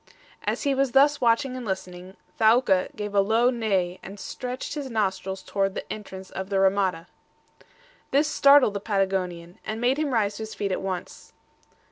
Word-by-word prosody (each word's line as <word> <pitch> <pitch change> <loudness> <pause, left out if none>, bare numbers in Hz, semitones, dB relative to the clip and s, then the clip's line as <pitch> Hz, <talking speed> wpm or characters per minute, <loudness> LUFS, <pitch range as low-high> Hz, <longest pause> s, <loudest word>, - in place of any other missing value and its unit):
As - - -1
he 280 -2 +2
was 270 -2 0
thus 285 +2 +4
watching 250 +2 +2
and 255 - -5
listening, 185 -2 -6 0.2
Thaouka 220 -4 +4
gave 210 -1 -5
a 200 - +4
low 225 +5 +3
neigh, 195 -7 -1
and 200 +2 -10
stretched 250 +4 -5
his 290 -3 -5
nostrils 195 -4 -2
toward 195 -1 -1
the - - -4
entrance 190 -3 -9
of 190 0 -5
the 200 - -2
RAMADA. 190 -3 +2 1.0
This 285 +3 +3
startled 280 -7 +5
the 200 - -2
Patagonian, 190 -4 -2
and 215 +1 -4
made 250 +4 +1
him 305 -3 0
rise 210 -4 0
to - - -7
his 220 0 -6
feet 200 -1 -2
at - - -1
once. 185 -2 -6
205 Hz, 175 wpm, -25 LUFS, 190-250 Hz, 1.0 s, startled